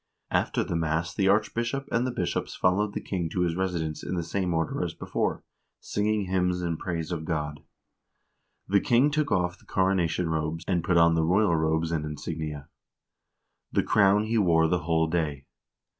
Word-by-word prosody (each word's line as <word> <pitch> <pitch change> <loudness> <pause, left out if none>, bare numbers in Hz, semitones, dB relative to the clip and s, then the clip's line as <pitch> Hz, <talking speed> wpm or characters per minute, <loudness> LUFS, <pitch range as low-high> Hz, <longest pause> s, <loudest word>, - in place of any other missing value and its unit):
After - - +1
the - - -3
mass 80 +1 -1
the 95 - +1
archbishop 115 +6 +1
and 120 +2 +1
the - - -1
bishops 90 -7 -2
followed 100 +3 +1
the - - -2
king 90 -4 -2
to 90 - -2
his 85 -2 +1
residence 85 -4 -2
in 90 - -4
the 85 - -1
same 90 +2 -2
order 80 -1 -1
as - - -4
before, - - -2 0.4
singing 105 0 -1
hymns 90 -1 0
in 85 -2 -1
praise 85 -1 -4
of 80 -2 -3
God. 75 -2 -3 1.1
The 100 +1 +4
king 125 +5 +3
took 150 -1 0
off 90 0 0
the - - -23
coronation 95 -2 +1
robes, 80 +1 -2
and 90 -4 +1
put 85 0 +2
on 85 0 +6
the 80 - +2
royal 90 +2 +3
robes 80 +1 0
and 80 -2 -1
insignia. 75 -1 -5 1.0
The - - +2
crown 100 0 +4
he 110 +1 +1
wore 85 -4 +4
the 90 +2 +1
whole 80 0 +2
day. 80 -4 -2
85 Hz, 180 wpm, -27 LUFS, 80-100 Hz, 1.1 s, on